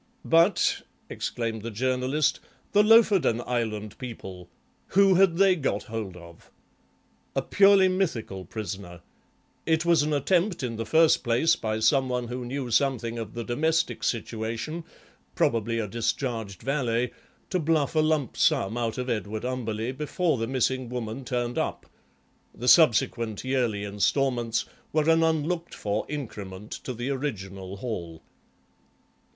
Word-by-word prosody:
"But," 165 +4 +3 0.3
exclaimed 115 -2 -3
the 115 - -5
Journalist, 130 +5 0 0.3
"the 205 - +5
Lofoden 210 - +5
Island 110 -4 -3
people! 95 -8 -8 0.4
Who 195 0 +5
had 180 -2 +4
they 195 -1 +5
got 145 -6 -1
hold 110 -6 -6
of?" 85 -1 -15 0.9
"A - - 0
purely 195 -1 +5
mythical 140 - -2
prisoner. 95 -5 -7 0.7
It 160 +1 +2
was 170 -3 +4
an 150 +1 -1
attempt 175 +4 +1
in 115 -3 -3
the 115 -1 -4
first 160 +7 +4
place 130 +8 +3
by 110 -7 -2
some 130 +3 +3
one 125 -1 -2
who 125 +1 -4
knew 130 0 -4
something 120 -2 +1
of 110 -1 -7
the 120 - -3
domestic 160 +8 0
situation, 115 +8 -3 0.5
probably 115 0 +1
a 110 -2 -1
discharged 115 -2 -3
valet, 125 -3 0 0.4
to 185 - +1
bluff 155 -3 +1
a 155 - +2
lump 155 -5 +1
sum 100 +5 +2
out 115 -2 -2
of 125 0 -3
Edward 110 -2 -3
Umberleigh 120 -2 -3
before 150 0 0
the 115 - -1
missing 130 0 0
woman 120 +1 -5
turned 120 -1 -2
up; - - -3 0.7
the 120 +3 -5
subsequent 115 - +4
yearly 125 -6 0
instalments 115 +3 0 0.3
were 155 0 +1
an 165 0 +5
unlooked 165 +2 0
for 105 +1 -2
increment 105 -8 -7
to 130 - -5
the 120 +4 -3
original 95 -8 -5
haul. 85 -8 -6
125 Hz, 140 wpm, -26 LUFS, 110-155 Hz, 0.9 s, the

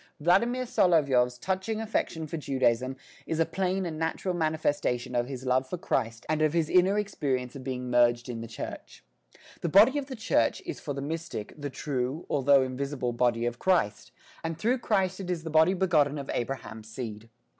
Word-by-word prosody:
Vladimir 235 +11 +3
Solovyov's 140 - +3
touching 190 - -2
affection 210 -7 -2
for 155 - -5
Judaism 130 -3 0 0.3
is 160 - -2
a 165 - +4
plain 190 +1 -1
and 160 -2 -4
natural 165 +3 -1
manifestation 145 -6 0
of 120 0 +1
his 130 -1 -6
love 130 +1 +1
for 180 - -3
Christ 115 - -2
and 155 0 0
of 155 -1 +3
his 165 -2 +1
inner 185 +3 +4
experience 135 -11 -2
of 135 - -7
being 125 -1 -4
merged 120 0 +3
in 120 -2 -5
the 115 - -6
Church. 115 - -8 0.6
The 170 - -2
body 220 - +6
of 275 - -6
the 265 - -6
Church 165 - +1
is - - -5
for 145 - -5
the 140 - -4
mystic 160 - -5
the 145 -1 -5
true, 135 +2 -3
although 140 -1 +5
invisible 130 -1 -3
body 120 -1 +1
of 120 0 -3
Christ, 170 - +1 0.3
and 165 -1 -3
through 240 +8 +1
Christ 190 -5 0
it 185 -2 -5
is 175 -3 -2
the 160 - -5
body 160 +4 +5
begotten 155 -6 +2
of 140 -1 -5
Abraham's 115 -3 -4
seed. 115 -2 -6
145 Hz, 190 wpm, -28 LUFS, 125-180 Hz, 0.6 s, body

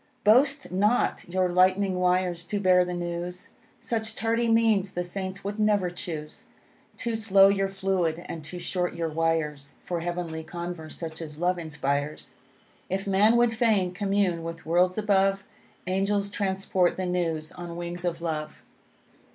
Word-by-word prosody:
Boast 270 +6 +4
not 205 +1 +1
your 185 +1 +1
lightning 185 +1 +3
wires 180 -1 +1
to 205 +3 -2
bear 185 -2 +5
the 180 0 -4
news, 175 +1 -4 0.3
Such 220 -1 -3
tardy 230 +1 0
means 225 -4 +3
the 180 - -1
Saints 185 +2 -5
would 205 +2 -4
never 205 -4 +2
choose; 160 -4 -6 0.5
Too 235 -2 -2
slow 200 -3 +5
your 195 -1 +1
fluid, 190 -4 -1
and 160 - -6
too 150 +5 -7
short 180 0 -2
your 165 -1 -2
wires 155 -3 -1
For 175 -1 -2
heavenly 170 -2 -4
converse, 170 -1 -6
such 165 -1 -6
as 150 -2 -8
love 180 +2 +1
inspires. 150 -2 -3 0.6
If 195 +2 -2
man 200 +4 +4
would 240 -1 +4
fain 220 -6 +2
commune 195 -3 0
with 165 0 -7
worlds 180 +3 +2
above, 195 -2 +2 0.4
Angels 200 +2 0
transport 190 -3 0
the 185 - -2
news 165 -3 -1
on 175 -1 -8
wings 175 0 -5
of 170 -1 -2
love. 155 -2 -4
180 Hz, 150 wpm, -27 LUFS, 170-200 Hz, 0.6 s, bear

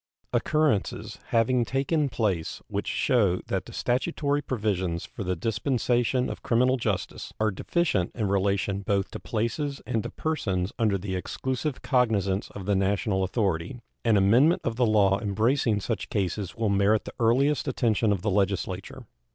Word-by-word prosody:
Occurrences 150 -10 0
having 120 +2 +2
taken 140 +4 0
place 100 -9 -1
which - - -3
shew 100 -8 +2
that - - -1
the - - -9
statutory 145 +3 0
provisions 95 -10 -2
for - - -7
the 90 0 -1
dispensation 120 - 0
of - - -6
criminal 125 +2 +3
justice 105 -6 -3
are 110 0 +2
deficient 105 - 0
in 110 -4 -1
relation 100 0 0
both 100 0 -1
to - - -6
places 115 - -2
and 115 - -1
to - - -5
persons 100 - -2
under 105 -4 +2
the 95 0 -4
exclusive 130 - -3
cognizance 105 -7 +1
of 95 - -8
the 100 0 +2
national 95 0 +1
authority, 95 0 -1 0.2
an 115 -3 +4
amendment 120 - +4
of 115 - -1
the 120 0 +2
law 100 -2 +4
embracing 110 +2 +1
such 105 -1 -3
cases 95 -1 -2
will 115 -2 0
merit 100 +2 +2
the - - -7
earliest 135 +6 +2
attention 115 -4 +1
of 95 -3 -1
the 105 - +1
Legislature. 100 -1 -1
110 Hz, 155 wpm, -27 LUFS, 95-125 Hz, 0.2 s, an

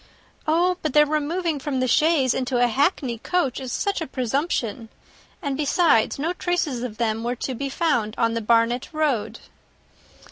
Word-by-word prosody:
"Oh, 350 +3 +2
but 310 -4 -2
their 300 0 +6
removing 310 +2 -1
from 270 -1 -2
the 255 - +1
chaise 300 -2 +3
into 255 -1 -1
a 245 - +4
hackney 255 - 0
coach 310 -3 -1
is 260 -2 -6
such 400 -3 -1
a 320 - -3
presumption! 255 -3 -2 0.5
And, 280 -2 -1
besides, 290 -4 +2
no 320 +5 -1
traces 345 -9 -1
of 235 -4 -5
them 225 -1 -1
were 240 +1 -1
to 260 +2 -4
be 275 +3 -4
found 265 - 0
on 230 0 +1
the 230 - -2
Barnet 230 +2 +2
road." 245 -8 -1
265 Hz, 170 wpm, -23 LUFS, 235-310 Hz, 0.5 s, their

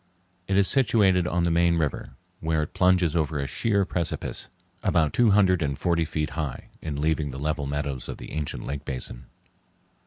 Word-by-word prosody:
It 95 - +1
is 100 -1 +5
situated 100 -9 +4
on 90 -1 0
the 85 - +2
main 85 0 +3
river, 75 -3 -2 0.2
where 80 -1 0
it 75 - -7
plunges 90 -3 +3
over 80 -2 0
a 70 - -1
sheer 100 - +1
precipice, 85 -3 -3 0.3
about 80 -4 +2
two 120 -2 +4
hundred 95 -3 +4
and 70 -3 -1
forty 85 -2 +1
feet 75 -1 -2
high, 75 -6 -4
in 75 -3 -4
leaving 75 -1 0
the 65 - -7
level 75 0 -2
meadows 70 -3 -3
of - - -5
the - - -9
ancient 75 -1 -4
lake 70 +1 -4
basin. 65 -2 -5
80 Hz, 185 wpm, -26 LUFS, 75-90 Hz, 0.3 s, is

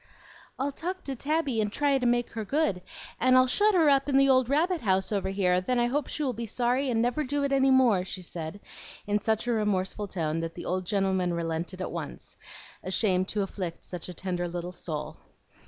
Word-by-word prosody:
"I'll 275 +2 -1
talk 365 +6 -5
to 275 - -4
Tabby 280 -3 0
and 210 -1 -1
try 280 +2 +2
to 250 - +1
make 240 0 +1
her 225 -1 -4
good, 210 -6 0 0.4
and 255 +1 +5
I'll 255 - +6
shut 410 +11 +3
her 330 -4 +5
up 275 0 +3
in 270 - +3
the 275 0 +5
old 260 -2 +4
rabbit 330 +4 +1
house 190 -2 +1
over 200 -2 0
here; 185 -2 +2
then 250 +7 0
I 240 - +3
hope 285 +5 -1
she 305 - -3
will 260 -3 0
be 230 +1 -5
sorry 250 +4 0
and 230 -2 +1
never 245 +5 0
do 285 +1 -1
it 280 - 0
any 270 0 +4
more," 245 -8 +4
she 185 0 -5
said, 170 +3 -6 0.4
in 205 0 +1
such 220 +1 0
a 245 - 0
remorseful 210 -2 0
tone 165 -4 -2
that 165 0 -4
the 175 - -7
old 185 +1 -1
gentleman 190 -3 +1
relented 170 +2 -3
at - - -4
once, - - -7 0.5
ashamed 185 -1 +1
to 205 -1 -1
afflict 185 -3 -5
such 180 -1 -6
a - - -6
tender 180 0 -2
little 175 +1 -5
soul. 155 -3 -5
215 Hz, 220 wpm, -28 LUFS, 185-270 Hz, 0.5 s, I'll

